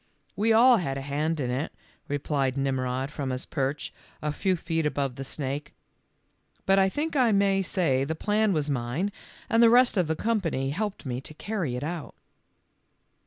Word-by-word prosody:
w 210 - -1
We - - +5
all 240 +2 +7
had 135 -8 -2
a - - -4
hand 150 +3 -1
in 125 -3 -1
it," 130 +5 -2 0.4
replied 140 -2 -1
Mmrod 130 0 -1
from 140 -3 -4
his 130 0 -3
perch 140 0 -2 0.3
a 150 - -2
few 185 +5 0
feet 165 -1 -2
above 140 -4 -1
the 135 - -5
snake, 140 +1 -4
lf - - -44
but 195 0 +4
I 190 0 +4
think 300 +9 -3
I 250 -4 +4
may 195 -1 +3
say 165 -8 +1
the 160 +4 -2
plan 210 +4 +1
was 155 -5 0
mine 140 +8 -1 0.4
and 230 -2 +3
the 230 - +8
rest 245 -1 +5
of 180 -4 +2
the 160 - 0
company 165 -10 -1
helped 205 +3 -3
me 125 -1 -3
to 155 - -9
carry 180 - -3
it 125 - -4
out." 165 0 -5
155 Hz, 190 wpm, -27 LUFS, 135-200 Hz, 0.4 s, the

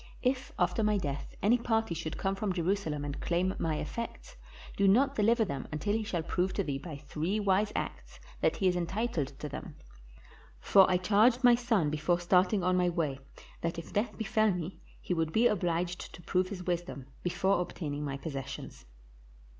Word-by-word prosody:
If 255 0 0
after 180 +3 +1
my 210 -1 +2
death 145 -6 -4
any 235 +5 +4
party 225 -5 0
should 160 -1 -4
come 195 0 0
from 195 -1 -1
Jerusalem 170 -4 -1
and 145 0 -5
claim 180 +2 +1
my 160 -2 0
effects, 230 +10 -5 0.4
do 200 - +3
not 265 +8 +4
deliver 225 0 +3
them 140 -8 -4
until 155 +7 -1
he 220 0 0
shall 175 -6 -2
prove 180 +3 0
to 200 - 0
thee 140 -5 -3
by 155 -1 -7
three 155 +8 -2
wise 205 +1 +2
acts - - -5 0.2
that - - +2
he 190 - +1
is 180 - +3
entitled 180 - -1
to 150 - -5
them; 145 +2 -7 0.8
for 190 - +6
I 180 - +4
charged 220 +7 +3
my 245 -1 +8
son 230 -10 +1
before 155 +3 +1
starting 180 +2 +3
on 180 0 +2
my 180 -1 +3
way, 155 -6 -1 0.4
that 170 0 -2
if 165 - -8
death, 210 +4 -1
befell 220 0 +2
me 180 0 -4 0.2
he - - -2
would 165 -2 0
be 225 +7 +3
obliged 175 -4 0
to - - -13
prove 185 +1 +1
his 185 -3 -6
wisdom 175 -6 -3 0.2
before 185 +1 +1
obtaining 150 -4 -4
my 140 -2 -3
possessions." 135 -2 -7
180 Hz, 185 wpm, -31 LUFS, 160-210 Hz, 0.8 s, my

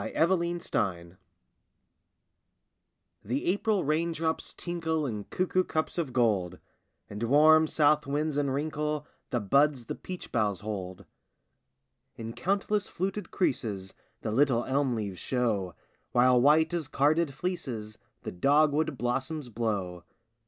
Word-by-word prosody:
SHOWERY 170 0 +2
TIME 90 - -3 2.1
The 125 +7 -2
April 205 +1 +1
rain 160 +4 +1
drops 160 0 -2
tinkle 165 -3 -2
In 105 -6 -4
cuckoo 185 0 0
cups 160 0 -2
of 155 -6 -2
gold, 105 -8 +1 0.5
And 105 +1 -8
warm 155 +6 +6
south 150 -1 +3
winds 150 +1 -1
unwrinkle 150 +1 -1 0.2
The 120 - 0
buds 140 +4 +2
the - - -4
peach 185 -1 -8
boughs 105 -4 0
hold. 100 -3 -6 1.1
In 115 0 -6
countless 200 - 0
fluted 190 +1 -3
creases 105 - -2 0.3
The 110 - -3
little 125 0 +2
elm 135 -2 +1
leaves 100 -4 -4
show, 105 -9 -1 0.4
While 125 0 +5
white 155 +5 +4
as 165 -5 -2
carded 145 +1 +1
fleeces 125 - -4 0.2
The - - -4
dogwood 145 - +2
blossoms 135 +4 -2
blow. 100 -6 -3
140 Hz, 120 wpm, -29 LUFS, 110-160 Hz, 2.1 s, warm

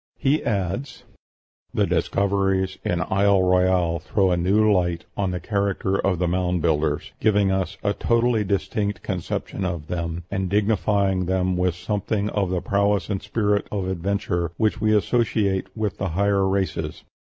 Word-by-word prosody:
He 140 +3 +1
adds, 105 +6 -2 0.7
"The - - +3
discoveries 95 -1 0
in 90 -1 0
Isle 100 0 +4
Royale 90 -2 +2
throw 95 +2 +1
a - - +3
new 105 +5 +3
light 90 -3 0
on 100 -2 0
the 90 0 -3
character 100 0 -1
of 95 -2 +1
the 90 +1 0
'Mound 90 0 0
Builders,' 75 -2 0
giving 105 -2 +3
us 95 0 -1
a 100 -1 +1
totally 115 -1 +1
distinct 100 +1 -2
conception 95 +1 -3
of 85 -4 -4
them, 85 -1 -3
and 95 -2 -1
dignifying 100 -2 +1
them 95 0 +1
with 90 -1 +1
something 105 +2 -2
of 100 -3 0
the 90 -1 -1
prowess 100 +1 +1
and 95 - -2
spirit 105 0 0
of 100 -3 -2
adventure 95 -2 -1
which 110 0 0
we 110 0 +3
associate 105 -4 +1
with 105 -4 -2
the 95 - -1
higher 100 +2 +2
races. 95 -5 -2
95 Hz, 155 wpm, -23 LUFS, 90-105 Hz, 0.7 s, Isle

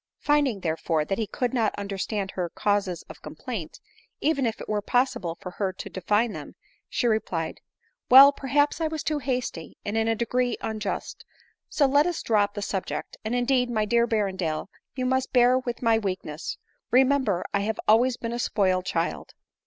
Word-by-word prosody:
Finding, 285 -8 +1
therefore, 160 -2 0
that 195 +7 -2
he 220 - -1
could 245 +4 -2
not 225 -4 +1
understand 200 0 -3
her 180 -2 -3
causes 200 -2 -1
of - - -13
complaint, - - -7 0.4
even 280 -4 +1
if 225 - -3
it - - -8
were 210 -1 0
possible 200 -8 0
for 180 - -7
her 195 0 -2
to - - -8
define 210 +5 +1
them, - - -8 0.3
she - - -1
replied, 185 -8 -1 0.2
" - - -44
Well, 270 +3 +10
perhaps 290 +3 +1
I 320 - +2
was 315 -1 -4
too 305 -1 -1
hasty, 250 - -3
and 205 - -2
in 225 0 +1
a 225 - +2
degree 245 +2 0
unjust; 220 -1 -4 0.5
so 290 - +2
let 285 +4 +4
us 350 - -3
drop 205 -2 +2
the 205 - -3
subject; 190 -2 -4
and, 220 +3 -2
indeed, 250 0 +2
my 215 -3 0
dear 235 +2 +2
Berrendale, 190 -7 -1 0.3
you 255 -1 -2
must 260 0 0
bear 250 0 +5
with 245 -2 -5
my 225 -1 +4
weakness: 185 -6 -4 0.3
remember, 260 -7 +3
I 200 - +2
have 210 +2 -2
always 240 +3 +4
been 230 0 -4
a 240 - -3
spoiled 185 -5 +1
child." 165 0 -2
225 Hz, 185 wpm, -26 LUFS, 195-255 Hz, 0.5 s, Well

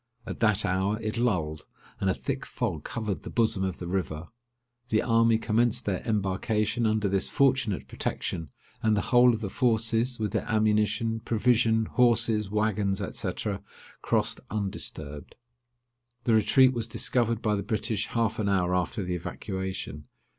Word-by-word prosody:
At - - -6
that 110 -2 +3
hour 95 +3 0
it 110 0 -3
lulled, 80 -10 -1 0.3
and 95 - +1
a - - +3
thick 140 -1 -4
fog 95 - -3
covered 110 -5 -3
the - - -8
bosom 110 -5 +1
of 95 -2 -2
the 85 - -6
river. 90 -3 -3 0.6
The 110 - +2
army 115 -1 +4
commenced 115 +2 +1
their 95 -3 -1
embarkation 105 +2 0
under 110 -1 +1
this 95 0 0
fortunate 130 -7 +1
protection; 80 -3 -4 0.3
and 110 -1 +2
the - - -2
whole 125 0 +7
of 115 -1 -3
the 100 - -3
forces, 115 0 +1
with 105 -2 -1
their - - -2
ammunition, 110 +1 +1
provision, 115 0 +2
horses, 115 -3 +2
waggons, 105 -2 0 0.2
&c. - - -1 0.7
crossed - - +1
undisturbed. 80 -8 -5 0.9
The 115 - +2
retreat 130 +4 +5
was 115 -2 -1
discovered 115 -1 0
by 105 - +2
the 100 - 0
British 105 0 -2
half 115 -1 -1
an 100 -2 0
hour 90 -2 +1
after 90 +3 -1
the 90 0 -3
evacuation. 95 -4 -5
110 Hz, 155 wpm, -27 LUFS, 95-115 Hz, 0.9 s, whole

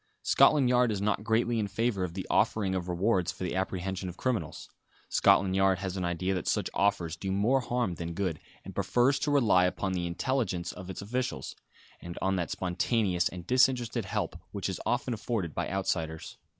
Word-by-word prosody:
Scotland 145 -4 +5
Yard 125 -1 +3
is 105 - -2
not 105 +1 0
greatly 115 +1 +1
in 105 - 0
favour 105 -1 -1
of 90 -1 -4
the 95 - -4
offering 100 -4 +1
of 90 -1 -3
rewards 90 0 +1
for - - -8
the 90 - -2
apprehension 95 0 -2
of 90 - -10
criminals. 115 - -2 0.4
Scotland 95 -1 +4
Yard 95 -1 +3
has 95 -1 -4
an 95 - -2
idea 85 +2 -1
that 90 -3 -3
such - - 0
offers 95 -5 +1
do 95 +3 -4
more 110 +8 +2
harm 120 -6 -1
than 85 0 -5
good, 90 -5 -2 0.3
and 95 - -8
prefers 120 +9 +2
to 150 - -1
rely 110 -11 +4
upon 95 +1 -1
the 90 -1 -1
intelligence 90 -2 -1
of 95 0 -10
its 95 - -6
officials; 125 - -3 0.5
and 85 0 -8
on 95 0 +1
that 90 -3 -2
spontaneous 95 0 0
and 90 -2 -9
disinterested 125 -3 +2
help 90 - -2
which - - -3
is - - -4
often 125 - 0
afforded 105 -7 -3
by - - -2
outsiders. 80 -4 -3
95 Hz, 190 wpm, -29 LUFS, 90-115 Hz, 0.5 s, Scotland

